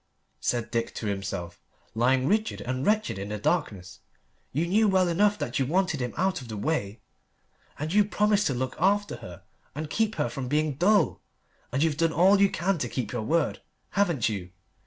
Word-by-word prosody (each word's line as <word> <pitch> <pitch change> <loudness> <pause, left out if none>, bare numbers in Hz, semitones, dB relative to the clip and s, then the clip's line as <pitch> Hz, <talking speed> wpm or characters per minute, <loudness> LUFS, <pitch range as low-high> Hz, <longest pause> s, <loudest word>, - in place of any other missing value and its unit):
said 120 -2 -1
Dick 115 0 -2
to - - -5
himself, 95 -4 -4 0.3
lying 130 +3 +2
rigid 215 +5 +1
and 130 +1 -3
wretched 215 - +1
in 100 +1 -5
the 105 - -3
darkness. 100 - -2 0.5
"You 155 +6 0
knew 210 +5 +3
well 190 -2 +3
enough 205 +4 +2
that 120 -8 -2
you 135 - +1
wanted 180 -1 +1
him 125 -2 -3
out 185 -3 0
of 125 - -10
the 110 -2 -6
way. 105 -5 -2 0.8
And 155 +3 -3
you 210 +1 +6
promised 210 0 +2
to 135 - -1
look 130 +1 -3
after 200 -1 +1
her 90 -8 -11 0.3
and 150 0 -5
keep 220 +3 0
her - - 0
from 125 +2 -5
being 150 +2 +1
dull. 185 +5 +2 0.5
And 135 +4 +1
you've 155 -3 +1
done 165 0 +2
all 190 +5 +5
you 200 - +6
can 185 +1 -1
to 125 - -2
keep 125 -1 -3
your 120 - -2
word, 160 +7 0 0.3
haven't 175 - +1
you? 100 -5 -4
150 Hz, 195 wpm, -27 LUFS, 120-190 Hz, 0.8 s, you